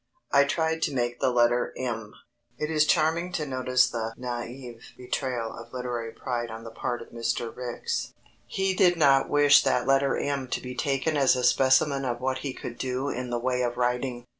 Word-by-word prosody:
I 140 0 +5
tried 160 +2 0
to 145 - -1
make 120 -1 -1
the 130 - +2
letter 120 0 +2
M. 115 -4 -4 0.4
It 150 +4 -3
is 155 -1 +3
charming 165 +3 +2
to 155 -3 -1
notice 130 -2 +2
the 115 -1 -4
naïf 120 -1 -7
betrayal 125 -2 -3
of 115 0 -11
literary 120 -2 -4
pride 120 -1 -4
on 110 0 -8
the 115 - -8
part 120 +1 -3
of - - -17
Mr. 115 0 -3
Ricks. 125 -1 -3 0.4
He 195 0 0
did 180 -2 +4
not 140 -3 +4
wish 145 0 +6
that 130 -2 +1
letter 135 +1 +2
M 140 -2 -2
to - - -2
be 125 0 -7
taken 135 +4 -1
as 135 -2 +4
a 125 - -2
specimen 135 +3 +3
of 120 -2 -2
what 130 0 -1
he 140 0 -4
could 120 -2 -8
do 130 +2 -2
in 125 0 -4
the 120 - -1
way 125 +1 -1
of 120 -1 -1
writing. 125 0 -1
125 Hz, 195 wpm, -27 LUFS, 120-140 Hz, 0.4 s, wish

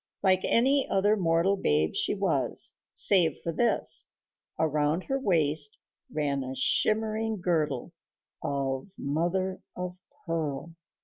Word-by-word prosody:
Like 185 -1 +3
any 270 +4 +2
other 205 +2 +3
mortal 170 0 +2
babe 75 - +1
she - - 0
was, - - +1 0.2
save 175 -7 +4
for 170 - -2
this: 235 +8 +2 0.5
around 155 +2 0
her 270 0 -2
waist 155 - +2 0.3
ran 140 -3 -1
a 130 +1 -6
shimmering 220 - 0
girdle 160 -5 -1 0.5
of 135 0 -2
mother 175 +6 -2
of 180 0 -6 0.3
pearl. 165 -1 -3
165 Hz, 115 wpm, -28 LUFS, 145-195 Hz, 0.5 s, save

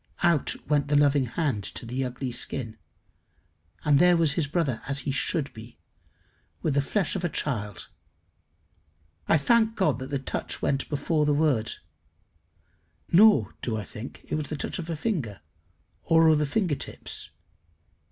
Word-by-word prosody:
Out 170 -5 +2
went 145 -1 +2
the 145 - +1
loving 145 -2 +4
hand 125 -6 -1
to 120 - -5
the 125 +3 -2
ugly 125 0 -4
skin, 120 -1 -2 1.1
and 145 -2 +5
there 180 0 +6
was 165 -3 +4
his 155 -2 0
brother 145 -6 -1
as 140 0 +1
he 135 - -2
should 140 +2 0
be 115 +1 -12 0.9
with 155 - +1
the 140 - +3
flesh 195 +8 0
of 185 - -3
a 175 - +1
child. 105 - -3 1.4
I - - +5
thank 225 +8 +3
God 190 -8 +1
that 130 - -6
the 140 - -1
touch 135 - -4
went 135 0 -1
before 150 +1 0
the 145 - +3
word. 145 -8 +1 1.4
Nor 185 - +6
do 110 -3 -2
I 105 - -4
think 105 +6 -9
it - - -6
was 150 -2 -1
the 155 - -3
touch - - -4
of 170 -1 -6
a 165 - -1
finger, 150 - -2 0.6
or 165 0 +4
of 155 -1 +4
the 150 - 0
finger 180 0 0
tips. - - -6
145 Hz, 165 wpm, -26 LUFS, 130-165 Hz, 1.4 s, there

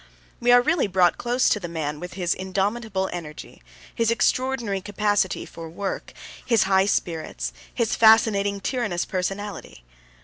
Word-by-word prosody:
We 245 +1 +3
are 245 0 +7
really 310 -2 +2
brought 180 -2 +2
close 245 +1 +1
to 210 - +1
the 175 - -5
man 150 -3 -4
with 180 +2 -7
his 175 -3 0
indomitable 195 +1 -2
energy, 160 -4 -8 0.3
his 230 -2 +1
extraordinary 235 -3 0
capacity 205 -1 0
for 165 -1 -9
work, 195 +4 -5 0.3
his 230 -4 +3
high 190 0 +3
spirits, 155 - -2 0.2
his 235 -2 0
fascinating, 205 -3 +4
tyrannous 210 -8 -1
personality. 195 - -5
200 Hz, 140 wpm, -24 LUFS, 180-225 Hz, 0.3 s, are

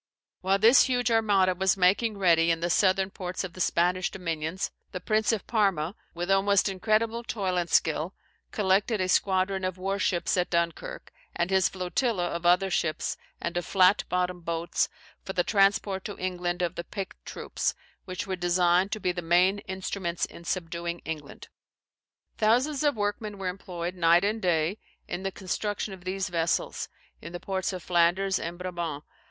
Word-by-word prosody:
While 190 +1 +2
this 225 +6 +7
huge 245 -2 +1
armada 205 -5 +3
was 190 +1 +1
making 200 +4 +3
ready 170 -3 +4
in 165 -1 +2
the 170 +1 -1
southern 190 +1 +3
ports 185 0 -4
of 185 -2 -6
the 185 - -6
Spanish 180 +1 +2
dominions, 165 0 -3 0.2
the 180 - -3
Prince 215 +3 +1
of 220 -3 -2
Parma, 195 -7 +1 0.2
with 175 +3 -2
almost 195 +1 +3
incredible 220 +4 0
toil 195 -6 -2
and 175 -1 -1
skill, 160 +4 +1 0.3
collected 205 +2 +1
a 185 - 0
squadron 190 0 +1
of 185 0 -2
war 195 +2 -2
ships 175 -2 +1
at 180 - +1
Dunkirk, 170 - -2 0.2
and 170 +2 -1
his 190 -2 +4
flotilla 185 +2 -1
of 170 0 -2
other 185 +2 +4
ships 155 -2 -1 0.2
and 170 - -4
of 175 - -1
flat 190 +3 +4
bottomed 180 -1 -1
boats 165 0 -1 0.3
for 190 - -5
the 175 - +2
transport 195 -1 +2
to 205 - -5
England 180 -1 -2
of 175 0 -1
the 170 - -5
picked 195 +1 -7
troops, - - -3 0.3
which 185 -1 -4
were 190 -1 -2
designed 180 +1 +2
to 215 - -3
be 180 - 0
the 175 0 -4
main 180 +4 +3
instruments 190 -2 -2
in 170 - -13
subduing 170 -1 -3
England. 155 -3 -7 0.9
Thousands 255 +7 +2
of 290 -3 +2
workmen 205 0 -2
were 190 -1 -2
employed, 180 -2 -5
night 170 0 +4
and 215 +2 0
day, 175 +2 +1 0.3
in 175 - -4
the 195 0 -2
construction 200 +2 -3
of 180 -1 -12
these 190 +1 -2
vessels, 165 -1 -1 0.3
in 170 +2 -9
the 175 - -5
ports 190 0 -2
of 185 -3 -6
Flanders 180 +2 +2
and 170 +1 -5
Brabant. 175 -5 -4
185 Hz, 175 wpm, -27 LUFS, 175-195 Hz, 0.9 s, this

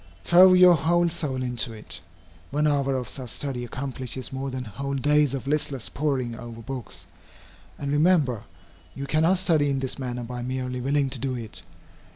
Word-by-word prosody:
Throw 185 +2 +7
your 180 -1 +8
whole 170 +2 +2
soul 140 -6 -2
into 125 -1 -2
it. 110 -1 -7 0.5
One 150 +2 0
hour 140 -2 +2
of 125 -2 -3
such 130 -3 -5
study 130 0 -2
accomplishes 130 0 -4
more 135 +1 -3
than 130 -1 -4
whole 140 +6 -4
days 145 0 +3
of 135 - -5
listless 140 -3 -1
poring 135 -5 -1
over 115 0 -9
books. 130 -1 -7 0.7
And, 140 0 -3
remember, 145 - +2 0.5
you 140 - -4
cannot 160 +6 +3
study 160 -6 +3
in 135 - 0
this 130 +1 -4
manner 125 -2 -4
by 125 +1 -6
merely 125 0 -3
willing 140 +1 +1
to 130 - -3
do 130 0 -2
it. 115 -3 -7
135 Hz, 175 wpm, -25 LUFS, 125-150 Hz, 0.7 s, your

